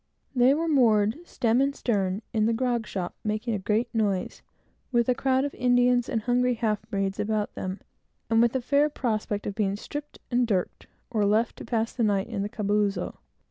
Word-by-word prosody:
They 255 Hz, +2 st, +5 dB
were 330 Hz, +2 st, -1 dB
moored, 225 Hz, -5 st, +3 dB
stem 235 Hz, +2 st, +1 dB
and 275 Hz, 0 st, +1 dB
stern, 200 Hz, -3 st, -1 dB
in 220 Hz, -1 st, +2 dB
a -, -, +2 dB
grog 240 Hz, -2 st, 0 dB
shop, 180 Hz, -3 st, -4 dB
making 215 Hz, +2 st, -1 dB
a 205 Hz, -, -1 dB
great 215 Hz, +5 st, 0 dB
noise, 205 Hz, -5 st, -1 dB, 0.5 s
with 235 Hz, -2 st, +2 dB
a 250 Hz, -, +4 dB
crowd 265 Hz, +1 st, +1 dB
of 285 Hz, -, -4 dB
Indians 245 Hz, 0 st, +3 dB
and 225 Hz, -2 st, -1 dB
hungry 250 Hz, +1 st, +2 dB
half 220 Hz, -3 st, 0 dB
breeds 195 Hz, -1 st, -2 dB
about 210 Hz, 0 st, -1 dB
them, 185 Hz, +1 st, -5 dB, 0.5 s
and 225 Hz, 0 st, +3 dB
with 235 Hz, +1 st, +2 dB
a 260 Hz, -, +1 dB
fair 285 Hz, +4 st, +3 dB
prospect 215 Hz, -6 st, -2 dB
of 205 Hz, -, -2 dB
being 200 Hz, -2 st, 0 dB
stripped 290 Hz, +7 st, -7 dB
and 245 Hz, 0 st, +2 dB
dirked, 190 Hz, -5 st, -2 dB, 0.2 s
or 215 Hz, -3 st, +1 dB
left 215 Hz, +3 st, +2 dB
to -, -, -8 dB
pass 225 Hz, -1 st, -1 dB
the 245 Hz, -, -3 dB
night 205 Hz, -3 st, +2 dB
in 215 Hz, -4 st, -3 dB
the 205 Hz, -, -2 dB
calabozo. 210 Hz, -2 st, -1 dB
225 Hz, 195 wpm, -26 LUFS, 205-245 Hz, 0.5 s, They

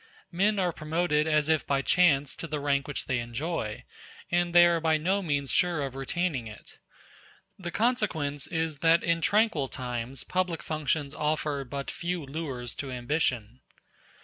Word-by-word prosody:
Men 200 Hz, +4 st, +2 dB
are 180 Hz, -2 st, +1 dB
promoted 155 Hz, -1 st, 0 dB
as 155 Hz, -1 st, +2 dB
if 160 Hz, -1 st, +2 dB
by 140 Hz, -1 st, +1 dB
chance 145 Hz, -6 st, +3 dB
to 165 Hz, -, -5 dB
the 150 Hz, -1 st, -3 dB
rank 140 Hz, -1 st, 0 dB
which 145 Hz, -, -4 dB
they 130 Hz, -2 st, 0 dB
enjoy, 120 Hz, -1 st, -3 dB, 0.5 s
and 175 Hz, 0 st, +2 dB
they 175 Hz, 0 st, +8 dB
are 170 Hz, -1 st, +3 dB
by 160 Hz, -1 st, +2 dB
no 190 Hz, +6 st, +1 dB
means 145 Hz, -6 st, -1 dB
sure 175 Hz, -4 st, +2 dB
of 135 Hz, -, -6 dB
retaining 135 Hz, -1 st, -2 dB
it. 105 Hz, -1 st, -13 dB, 0.8 s
The 175 Hz, -2 st, -4 dB
consequence 175 Hz, -, 0 dB
is 160 Hz, -3 st, -2 dB
that 165 Hz, +2 st, +4 dB
in 170 Hz, 0 st, +1 dB
tranquil 205 Hz, -8 st, +2 dB
times 125 Hz, 0 st, -5 dB
public 180 Hz, -3 st, -1 dB
functions 155 Hz, -2 st, -1 dB
offer 150 Hz, -2 st, -1 dB
but 140 Hz, +2 st, -5 dB
few 175 Hz, -2 st, -3 dB
lures 135 Hz, -5 st, -4 dB
to 140 Hz, -, -4 dB
ambition. 125 Hz, -3 st, -1 dB
155 Hz, 160 wpm, -28 LUFS, 135-170 Hz, 0.8 s, they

